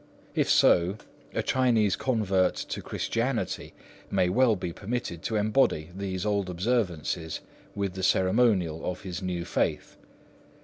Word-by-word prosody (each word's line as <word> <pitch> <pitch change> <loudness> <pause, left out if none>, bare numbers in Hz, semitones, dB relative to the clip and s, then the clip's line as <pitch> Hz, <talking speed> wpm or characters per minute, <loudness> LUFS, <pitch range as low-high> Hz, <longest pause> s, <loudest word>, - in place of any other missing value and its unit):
If - - +1
so, 90 +4 +4 0.3
a - - -1
Chinese 115 -6 +2
convert 100 -7 +1
to - - -5
Christianity - - -2 0.3
may 90 - +2
well 115 +3 +4
be 90 -2 -4
permitted 100 -5 -4
to 110 - -3
embody 105 - +2
these 95 -1 -3
old 100 -3 0
observances 90 -5 -1 0.3
with 100 -2 -2
the 95 - -5
ceremonial 95 -4 +2
of 90 0 -3
his 90 -2 -5
new 90 -2 -3
faith. - - -1
95 Hz, 130 wpm, -27 LUFS, 90-110 Hz, 0.3 s, so